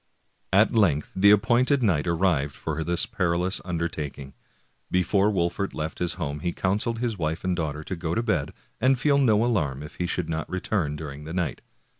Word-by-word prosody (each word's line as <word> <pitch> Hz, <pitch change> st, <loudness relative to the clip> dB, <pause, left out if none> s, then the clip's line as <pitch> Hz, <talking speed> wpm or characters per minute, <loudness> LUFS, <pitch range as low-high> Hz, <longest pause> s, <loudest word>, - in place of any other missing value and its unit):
At 100 Hz, +3 st, +4 dB
length 85 Hz, -10 st, +2 dB
the 100 Hz, +2 st, +5 dB
appointed 125 Hz, +6 st, +4 dB
night 90 Hz, -7 st, +2 dB
arrived 85 Hz, -5 st, +1 dB
for 80 Hz, 0 st, -3 dB
this 85 Hz, +2 st, +1 dB
perilous 95 Hz, -4 st, 0 dB
undertaking. 80 Hz, -6 st, -4 dB, 0.6 s
Before 95 Hz, +3 st, +2 dB
Wolfert 95 Hz, 0 st, -1 dB
left 80 Hz, +1 st, -4 dB
his 90 Hz, -1 st, 0 dB
home 75 Hz, -5 st, -4 dB
he 85 Hz, +3 st, -2 dB
counseled 105 Hz, +5 st, 0 dB
his 115 Hz, -4 st, -2 dB
wife 80 Hz, +1 st, -2 dB
and 90 Hz, -1 st, 0 dB
daughter 75 Hz, -3 st, -3 dB
to 95 Hz, -, -4 dB
go 85 Hz, -1 st, -3 dB
to 115 Hz, -, 0 dB
bed, 80 Hz, -11 st, 0 dB, 0.3 s
and 130 Hz, +3 st, +3 dB
feel 140 Hz, +1 st, +3 dB
no 115 Hz, -4 st, +4 dB
alarm 75 Hz, -, 0 dB
if 75 Hz, -, -11 dB
he 90 Hz, -, -1 dB
should 90 Hz, -2 st, -2 dB
not 80 Hz, -2 st, -3 dB
return 90 Hz, -5 st, -1 dB
during 75 Hz, -1 st, -7 dB
the 80 Hz, -, -6 dB
night. 90 Hz, -3 st, -2 dB
90 Hz, 185 wpm, -25 LUFS, 80-105 Hz, 0.6 s, the